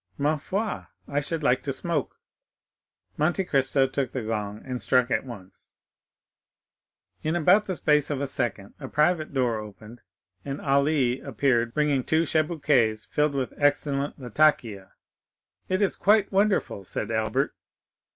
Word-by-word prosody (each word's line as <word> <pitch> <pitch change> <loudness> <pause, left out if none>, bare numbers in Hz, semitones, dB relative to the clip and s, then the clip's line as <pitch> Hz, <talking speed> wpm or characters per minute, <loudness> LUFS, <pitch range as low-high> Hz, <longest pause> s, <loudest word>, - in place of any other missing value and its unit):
"Ma 145 +2 +1
foi, 200 +8 -3 0.2
I 145 - 0
should 155 +2 -3
like 125 -2 +3
to 140 - -3
smoke." 150 +1 -2 1.0
Monte 175 +5 +1
Cristo 135 -4 +2
took 135 -1 -2
the 130 - -3
gong 105 -1 -3
and 125 -2 -4
struck 125 -2 +2
it - - +1
once. 100 -7 -12 1.5
In 155 +2 -1
about 195 +5 +4
the 190 - -2
space 150 -2 +2
of 145 -3 -2
a 140 - -1
second 120 -7 -3
a 135 - -6
private 155 +3 +1
door 125 -5 0
opened, 105 +2 -11 0.4
and 140 0 -5
Ali 140 -2 +1
appeared, 120 -3 0
bringing 150 -3 +1
two 160 +4 +2
chibouques 145 -9 +1
filled 150 -1 +1
with 130 -2 -2
excellent 145 -1 0
latakia. 120 -6 +1 0.8
"It 185 +2 +1
is 195 - +1
quite 210 0 +3
wonderful," 195 - +1
said 95 - -4
Albert. 110 -1 0
140 Hz, 140 wpm, -26 LUFS, 120-155 Hz, 1.5 s, about